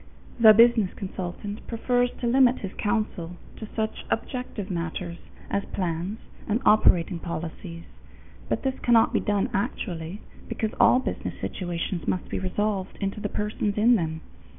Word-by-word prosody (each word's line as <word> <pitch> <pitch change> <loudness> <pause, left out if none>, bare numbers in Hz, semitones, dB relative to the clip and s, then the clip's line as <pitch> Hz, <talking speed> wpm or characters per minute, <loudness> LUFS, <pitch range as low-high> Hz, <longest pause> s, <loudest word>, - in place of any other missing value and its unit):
The 220 -2 +10
business 225 -3 +5
consultant 195 +2 -6
prefers 245 +1 +1
to - - -1
limit 255 +1 +5
his 195 -1 -5
counsel 205 -6 -2 0.2
to 220 - -7
such 220 -1 -2
objective 225 -4 -3
matters 170 0 -4 0.3
as 200 - -1
plans 180 +2 -3 0.3
and 215 +3 +2
operating 180 -5 +4
policies, 170 +1 -6 0.7
but - - -1
this 265 -1 -1
cannot 235 -2 +4
be - - +3
done 205 -2 +1
actually, 180 -1 -3 0.3
because 220 -1 -2
all - - +7
business 260 - -3
situations 175 -2 -3
must 185 - -1
be - - -2
resolved 195 +1 -2
into 195 +1 -2
the 205 - -3
persons 210 0 -2
in 230 +4 +5
them. 160 -5 -2
205 Hz, 145 wpm, -26 LUFS, 175-220 Hz, 0.7 s, The